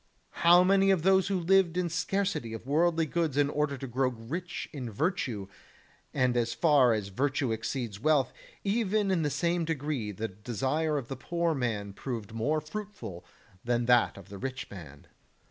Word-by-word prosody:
How 175 +1 +7
many 195 +1 +4
were 190 - +3
those 190 +3 +3
who 195 -2 0
lived 180 0 +3
in 180 -1 +1
scarcity 170 - -1
of 115 - -7
worldly 165 +3 +2
goods 160 -2 -1
in 145 0 +3
order 150 -2 0
to 135 - -6
grow 130 +1 0
rich 130 +10 -5
in 130 -5 -5
virtue; 120 - -2 0.6
and 130 -3 +1
as 115 -1 0
far 145 -7 +5
as 105 -2 -2
virtue 135 +4 0
exceeds 110 -2 -3
wealth, 135 -1 +2 0.3
even 205 -1 +1
in 180 -3 +2
the 150 - +1
same 170 +3 0
degree 145 -8 -2
the 110 +3 -3
desire 130 +10 -1
of 130 -4 -4
the 135 - -5
poor 170 +5 -1
man 110 -7 -2
proved 115 -2 -5
more 145 +8 0
fruitful 185 - -7 0.4
than 120 0 0
that 120 -3 +4
of 100 - -12
the 100 -1 -8
rich 130 +2 -5
man. 75 -7 -11
140 Hz, 175 wpm, -29 LUFS, 115-170 Hz, 0.6 s, How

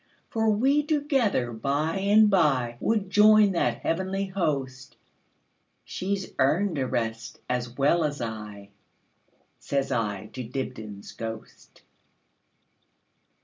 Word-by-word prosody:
For 225 -1 +1
we 265 +8 +3
together 275 - 0
by 145 +9 -1
and 205 +2 +5
byWould 155 - +1
join 210 0 +6
that 120 -10 0
heavenly 190 +3 -1
host; 135 -9 -3 0.9
She 195 +2 -2
's 190 -1 -8
earned 160 +5 +2
a 130 - 0
rest 115 0 -3
as 125 -1 -3
well 145 +5 +3
as 145 -1 -2
I,"Says 105 +5 -7
I 105 -6 -2
to 130 - -5
Dibdin's 110 -5 -6
ghost. 110 -1 -9
140 Hz, 105 wpm, -26 LUFS, 120-200 Hz, 0.9 s, join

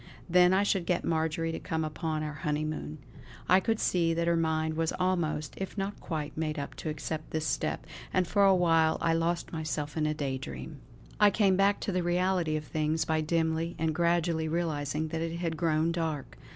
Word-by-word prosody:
Then 180 0 +5
I 190 +2 +4
should 190 -4 0
get 175 - +1
Marjory 160 0 0
to - - -4
come 160 -1 -2
upon 155 0 -2
our 150 0 -5
honeymoon. 150 - -2 0.5
I 185 +2 +6
could 225 +3 0
see 165 -2 +2
that 170 0 0
her 170 0 +3
mind 160 -1 0
was 165 0 0
almost, 170 -5 0
if 195 +2 -5
not 195 +1 -3
quite, 155 -3 -4
made 155 -1 -2
up 140 - -4
to 160 - -4
accept 155 +1 -4
this 160 0 -2
step; 145 - -1 0.3
and 185 -1 +2
for 200 +2 +3
a 195 -1 +6
while 165 -3 +3
I 165 - +2
lost 170 +1 -1
myself 155 -2 -3
in 155 -1 +1
a 155 - -1
day 135 -3 -2
dream. 145 +2 -7 0.4
I 210 0 +7
came 200 -2 +3
back 200 +1 +3
to - - -2
the 185 -1 0
reality 175 -2 +1
of 155 - -2
things 155 +1 0
by 160 0 +1
dimly 160 +1 0
and 160 0 0
gradually 170 -1 +1
realising 155 -2 -1
that 160 0 -3
it 165 0 -2
had 170 -2 -2
grown 160 0 +1
dark. 160 -4 -3
165 Hz, 205 wpm, -29 LUFS, 155-175 Hz, 0.5 s, I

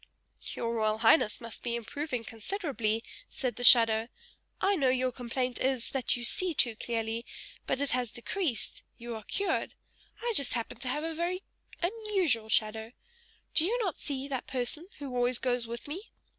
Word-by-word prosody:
"Your 230 0 -1
Royal 215 -1 +1
Highness 225 0 +4
must 230 -2 -8
be 235 -1 -1
improving 250 +2 -3
considerably," 230 - -2 0.3
said 255 -3 -3
the 245 - -5
shadow, 230 -2 +8 0.5
"I 395 +1 +3
know 275 -7 +3
your 255 0 +2
complaint 250 +1 -2
is, 260 -3 0
that 265 -2 +2
you 240 - -6
see 350 +7 +1
too 235 -5 +3
clearly, 225 0 -2 0.4
but - - 0
it 285 -1 0
has 250 -2 0
decreased, 260 - -2 0.2
you 235 0 -6
are 220 - -6
cured. 400 - -1 0.5
I 475 -1 +1
just 280 -7 +3
happen 235 -2 -3
to 260 - -3
have 295 +4 -1
a 325 0 -2
very 350 +3 -2 0.4
unusual 370 - +1
shadow! 220 +1 +1 0.6
Do 310 - +5
you 440 +8 +1
not 370 -7 -2
see 275 -1 -3
that 265 -3 -3
person 265 +6 -2
who 275 -4 -6
always 245 0 +3
goes 245 -2 0
with 235 +3 -6
me? 365 +9 -6
250 Hz, 170 wpm, -30 LUFS, 230-305 Hz, 0.6 s, shadow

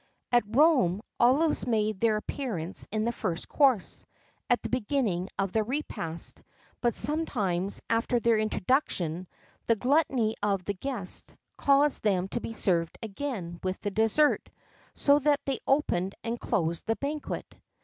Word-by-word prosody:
[XII 240 - +8
33] 205 - -20
At 230 - -3
Rome, 255 - +4 0.2
olives 275 +4 +3
made 215 -3 +1
their 220 -1 +3
appearance 210 - -4
in 215 +1 0
the 235 - +1
first 185 -8 -3
course, 265 -9 +2 0.5
at 245 - +4
the - - -3
beginning 220 -7 0
of 195 -1 0
the 220 - +2
repast; 215 - -4 0.4
but 240 -1 +1
sometimes, 205 - 0
after 230 +2 +1
their 230 -1 +3
introduction, 185 - 0 0.4
the 230 - +4
gluttony 255 -3 +2
of 200 -3 0
the 205 - -1
guests 205 -2 -4 0.2
caused 280 +1 +3
them 190 -3 +2
to 240 - -3
be 225 - -5
served 170 -6 0
again 200 -6 -5
with 185 0 -2
the 205 - -2
dessert: 225 +8 +2 0.5
so 285 0 +4
that 295 0 +3
they 275 -1 -1
opened 195 -10 +1
and 230 +1 -3
closed 165 0 -1
the 225 - +2
banquet. 290 +3 -5
225 Hz, 150 wpm, -28 LUFS, 190-270 Hz, 0.5 s, XII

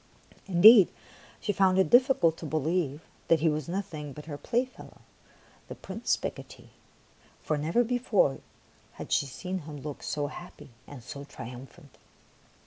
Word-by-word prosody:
Indeed, 195 +2 +8 0.5
she 205 - -2
found 190 -1 +3
it 190 - +2
diffi 255 +2 +5
cult 165 -1 +3
to 160 - -7
believe 155 0 -1 0.3
that 165 -2 +3
he 165 - +3
was 150 0 -3
nothing 170 -7 -5
but 150 +2 -10
her 155 -2 -6
playfellow, 245 - -4 0.7
the - - -8
Prince - - -2
Picotee, - - -8 0.7
for 155 - 0
never 160 +11 +1
be 245 +1 -1
fore 205 - +2 0.5
had - - -9
she 140 - +2
seen 185 +8 -5
him 150 -2 -9
look 145 -2 -7
so 145 -1 -2
happy 165 -1 -10 0.2
and 135 -5 -11
so 140 +3 -8
triumphant. 130 +1 -11
160 Hz, 150 wpm, -28 LUFS, 145-190 Hz, 0.7 s, Indeed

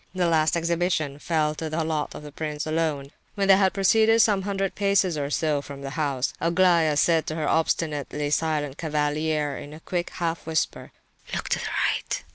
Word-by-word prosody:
The 180 -1 +1
last 160 -1 +2
exhibition 170 -4 -1
fell 155 -1 0
to 160 +1 -5
the 160 +1 -1
lot 155 -2 -2
of - - -8
the 150 - -9
prince 150 0 -4
alone. 155 -3 -1 0.2
When 200 -1 0
they 195 -1 +7
had 190 -1 +3
proceeded 220 +3 +4
some 210 -3 +4
hundred 195 -1 -2
paces 200 -4 +2
or 140 -1 -2
so 150 -1 0
from 140 -1 -9
the 135 - -5
house, 140 -4 -1
Aglaya 170 -2 +3
said 165 +1 +3
to 155 - -3
her 155 - -2
obstinately 150 -2 -1
silent 150 -3 -1
cavalier 150 -1 -1
in 145 - -9
a - - -11
quick 175 +1 -3
half 165 -2 -3
whisper: 160 0 -2 0.4
"Look - - -4
to - - +1
the - - -4 0.2
right!" - - -4
160 Hz, 190 wpm, -25 LUFS, 150-175 Hz, 0.4 s, they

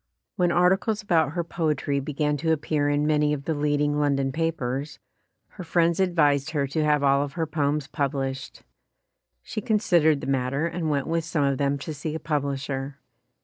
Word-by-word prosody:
When 180 -4 +2
articles 190 +5 +2
about 160 -7 +2
her 170 0 -1
poetry 155 -4 -1
began 150 +1 -1
to 160 +3 0
ap 160 -2 +1
pear 145 -2 +1
in 145 +1 +1
many 150 -1 +2
of 140 -1 -5
the 160 - 0
leading 145 0 0
London 140 -2 +1
papers, 145 -3 -2 0.5
her 185 - -9
friends 170 0 +1
advised 150 -6 +2
her 145 -3 0
to 145 +3 -1
have 150 -1 +2
all 140 0 +4
of 145 -1 -4
her 165 -2 -1
poems 150 -1 -1
pub 140 -1 -2
lished. 135 -1 -5 0.8
She 215 - -5
considered 170 -9 +3
the - - -5
matter 135 +2 0
and 170 -1 -2
went 140 -2 0
with 165 0 -1
some 160 -2 -1
of 140 -1 +1
them 140 0 +1
to 155 +3 -6
see 150 +1 -5
a - - -3
publisher. 140 -2 -3
150 Hz, 190 wpm, -25 LUFS, 140-165 Hz, 0.8 s, all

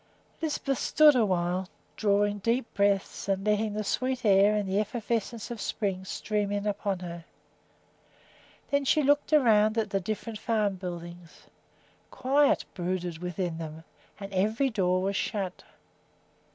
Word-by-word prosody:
Lisbeth 290 -4 -1
stood 310 -1 +6
still 250 - +3
awhile, 180 -2 0 0.3
drawing 205 0 +1
deep 230 +4 -1
breaths 200 -1 0
and 195 0 0
letting 210 0 +1
the 215 - -1
sweet 255 +3 -1
air 200 +1 +5
and 205 -2 -1
the 190 +2 +1
effervescence 230 +1 -3
of 230 -3 -5
spring 195 -2 -2
stream 205 +1 -2
in 205 0 -2
upon 200 -1 -1
her. 170 -1 -7 1.5
Then 280 0 +2
she 300 +2 +3
looked 290 +2 +2
around 220 -7 +4
at 215 -2 0
the 195 - +1
different 215 +3 -5
farm 210 -4 0
buildings. 175 -1 -8 0.7
Quiet 275 +2 +2
brooded 180 -2 -3
within 180 -1 -3
them 160 0 -7 0.4
and 195 -1 -8
every 220 +8 +1
door 185 -3 +1
was 200 +1 -1
shut. 190 -2 -3
205 Hz, 140 wpm, -28 LUFS, 185-230 Hz, 1.5 s, stood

